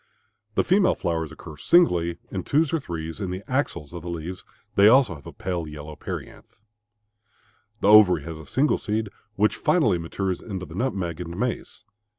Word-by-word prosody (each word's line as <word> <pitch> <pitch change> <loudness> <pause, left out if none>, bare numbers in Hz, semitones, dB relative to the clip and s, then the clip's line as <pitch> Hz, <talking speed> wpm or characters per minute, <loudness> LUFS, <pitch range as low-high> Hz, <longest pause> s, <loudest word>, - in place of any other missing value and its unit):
The - - +3
female 190 +1 +3
flowers 80 -2 -2
occur 80 -1 -11
singly, 85 - +3
in 95 - -2
twos 150 - +1
or 165 - +2
threes, 80 - -6
in 95 - -2
the 90 +2 -5
axils 125 - -2
of 85 - -6
the 85 - -7
leaves; 85 +2 -5 0.3
they 100 +1 +6
also 125 -4 +5
have 70 -4 -12
a - - -7
pale 90 -4 -4
yellow 75 0 -8
perianth. - - -8 1.3
The - - +2
ovary 105 -7 +7
has 80 0 -7
a 80 - -12
single 140 - +2
seed 110 0 -2 0.3
which 105 +1 +2
finally 110 - +2
matures 90 +2 -3
into 95 -4 -5
the 80 - -12
nutmeg 95 -6 -2
and 85 0 -6
mace. 125 +1 -3
90 Hz, 175 wpm, -25 LUFS, 80-110 Hz, 1.3 s, ovary